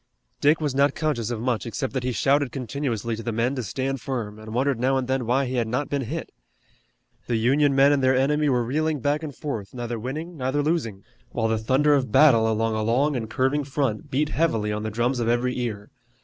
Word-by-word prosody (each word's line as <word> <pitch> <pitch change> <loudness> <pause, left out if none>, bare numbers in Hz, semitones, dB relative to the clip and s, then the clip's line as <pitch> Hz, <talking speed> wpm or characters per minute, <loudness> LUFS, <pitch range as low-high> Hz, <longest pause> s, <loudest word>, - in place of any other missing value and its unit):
Dick 150 +3 +4
was 150 -4 -1
not 140 +1 +2
conscious 140 -8 -1
of 120 -2 -3
much 120 0 -1
except 125 +3 -3
that 130 - -1
he 125 - -1
shouted 140 +2 +2
continuously 120 -3 -3
to 110 - -7
the 115 - -3
men 115 +4 0
to 130 - -3
stand 130 +5 -3
firm, 115 -6 -4
and 110 0 -9
wondered 130 +1 0
now 130 +2 +2
and 130 -1 -2
then 130 -3 -1
why 135 +3 +2
he 130 0 -3
had 115 -2 0
not 125 +5 -2
been 140 -1 0
hit. 160 +8 -5 1.0
The 120 - 0
Union 135 +5 +3
men 140 +1 +6
and 145 -1 +2
their 130 0 +4
enemy 150 +3 +2
were 125 -2 +2
reeling 155 +4 0
back 145 +4 0
and 150 -4 -6
forth, 115 -6 -5
neither 120 -1 -4
winning, 155 +9 -5
neither 135 +2 0
losing, 130 - -1 0.3
while 115 - 0
the 110 -1 +1
thunder 135 +6 +3
of 130 -5 +1
battle 115 -7 +5
along 110 +1 0
a 110 - -1
long 130 +7 +1
and 110 -3 -3
curving 135 +5 +1
front 135 -6 -2
beat 150 +3 0
heavily 115 -11 0
on 105 - -3
the 110 - -3
drums 120 +4 0
of 115 - -1
every 120 +2 +1
ear. 110 -4 -4
130 Hz, 230 wpm, -24 LUFS, 115-145 Hz, 1.0 s, men